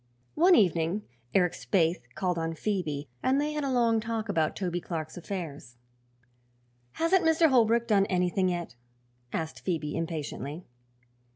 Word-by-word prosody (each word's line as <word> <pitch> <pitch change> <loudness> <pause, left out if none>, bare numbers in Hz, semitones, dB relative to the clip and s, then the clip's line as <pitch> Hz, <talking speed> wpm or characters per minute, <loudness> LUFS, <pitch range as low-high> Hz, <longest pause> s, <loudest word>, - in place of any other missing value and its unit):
One 355 +3 +6
evening 175 - +2 0.3
Eric 180 -3 +4
Spaythe 175 -3 +1
called 180 -2 -1
on 165 0 -2
Phoebe 155 -7 -2
and 265 +2 +2
they 300 +1 -1
had 300 -1 -2
a 275 - -1
long 235 -3 +3
talk 225 -1 -3
about 160 -5 +1
Toby 175 -2 -2
Clark's 160 -3 -5
affairs. 160 -9 -6 1.2
"Hasn't 350 +3 +2
Mr. 320 0 +4
Holbrook 235 -2 +4
done 200 -3 +3
anything 185 +1 +1
yet?" 175 -6 -3 0.6
asked 160 -1 -3
Phoebe 160 -5 -2
impatiently. 160 -1 -4
185 Hz, 135 wpm, -28 LUFS, 165-230 Hz, 1.2 s, One